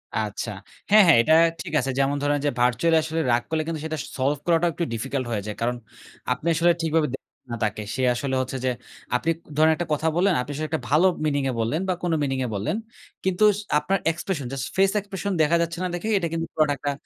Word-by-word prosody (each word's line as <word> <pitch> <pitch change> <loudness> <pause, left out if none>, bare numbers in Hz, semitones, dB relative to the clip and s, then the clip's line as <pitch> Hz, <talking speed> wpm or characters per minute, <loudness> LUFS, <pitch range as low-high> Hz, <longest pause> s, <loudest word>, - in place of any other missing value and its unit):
আচ্ছা। - - -2 0.4
হ্যাঁ, 210 0 +8
হ্যাঁ 160 - +7
এটা 155 +6 +3 0.3
ঠিক - - -8
আছে। 135 0 -1
যেমন 140 +1 +2
ধরেন 145 0 +2
যে, 145 - +3
virtually 125 +7 +3
আসলে 160 +1 -2
রাগ 120 - +3
করলে 160 -1 0
কিন্তু 160 -2 -3
সেটা 155 0 -3
s - - -9
solve 140 +2 0
করাটা 170 0 +3
একটু 170 +3 -3
difficult 130 +3 -3
হয়ে 105 - -1
যায়। 105 -1 -5
কারণ 120 +1 0 0.6
আপনি 145 +6 -7
আসলে 170 +2 +4
ঠিকভাবে 160 -1 +1
দেখেন 135 - -12
না 120 - -2
তাকে। 105 0 -1
সে 130 - -2
আসলে 135 +1 -2
হচ্ছে 130 +1 -4
যে, - - +3 0.5
আপনি 160 - 0 0.3
ধরেন 155 +1 +5
একটা 170 +1 -4
কথা 155 +2 0
বললেন, 185 +1 +3
আপনি 125 - -6
আসলে 155 +1 -3
একটা 160 -4 -2
ভালো 155 +6 +5 0.2
meaning 145 -3 0
এ - - 0
বললেন 115 +8 0
বা - - +3
কোনো 170 -2 +1
meaning 135 -2 -1
এ - - -2
বললেন। 110 - -1 0.5
কিন্তু 190 +2 +1
স - - -5 0.2
আপনার 195 +5 0
expression, 165 -3 -4
just 135 -1 -3
face 195 +1 +4
expression 200 0 -4
দেখা 155 +2 +3
যাচ্ছে 170 0 -2
না - - 0
দেখেই 215 +5 -2
এটা 170 -3 0
কিন্তু 165 0 -2
পুরাটা 155 -2 +2
একটা 145 +2 -2
155 Hz, 230 wpm, -24 LUFS, 135-170 Hz, 0.6 s, হ্যাঁ